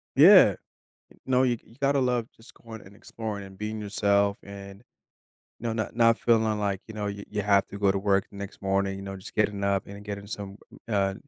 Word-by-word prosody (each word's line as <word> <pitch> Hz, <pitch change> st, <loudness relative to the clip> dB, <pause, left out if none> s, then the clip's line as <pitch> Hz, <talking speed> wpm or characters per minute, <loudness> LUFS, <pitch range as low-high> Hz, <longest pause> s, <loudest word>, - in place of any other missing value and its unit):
Yeah. -, -, +8 dB, 0.7 s
No. 130 Hz, 0 st, +3 dB
You 120 Hz, -2 st, +1 dB
you 115 Hz, -, -19 dB
gotta 140 Hz, 0 st, +2 dB
love 125 Hz, -3 st, 0 dB
just 120 Hz, +2 st, -17 dB
going 110 Hz, -2 st, -11 dB
and 95 Hz, +1 st, -16 dB
exploring 110 Hz, -2 st, -6 dB
and 95 Hz, 0 st, -13 dB
being 110 Hz, +1 st, -4 dB
yourself 100 Hz, 0 st, +1 dB
and, 100 Hz, +1 st, -10 dB, 0.8 s
know, 115 Hz, -1 st, -2 dB
not 110 Hz, -1 st, -3 dB
not 115 Hz, 0 st, +4 dB
feeling 110 Hz, -2 st, +2 dB
like, 100 Hz, -2 st, -1 dB
you 110 Hz, -, -9 dB
know, 105 Hz, -1 st, -4 dB
you 100 Hz, 0 st, -5 dB
you 105 Hz, -, -2 dB
have 100 Hz, -1 st, +3 dB
to 100 Hz, -, -7 dB
go 100 Hz, -1 st, +3 dB
to 100 Hz, -, -1 dB
work 100 Hz, 0 st, +1 dB
the -, -, -16 dB
next 100 Hz, -1 st, -8 dB
morning, 95 Hz, 0 st, 0 dB
you -, -, -8 dB
know, 95 Hz, 0 st, -6 dB
just 95 Hz, -, -11 dB
getting 105 Hz, -2 st, 0 dB
up 100 Hz, -1 st, 0 dB
and 100 Hz, +1 st, -10 dB
getting 100 Hz, -1 st, -6 dB
some, 100 Hz, -1 st, -7 dB, 0.3 s
uh, 100 Hz, -2 st, +1 dB
100 Hz, 215 wpm, -27 LUFS, 100-110 Hz, 0.8 s, Yeah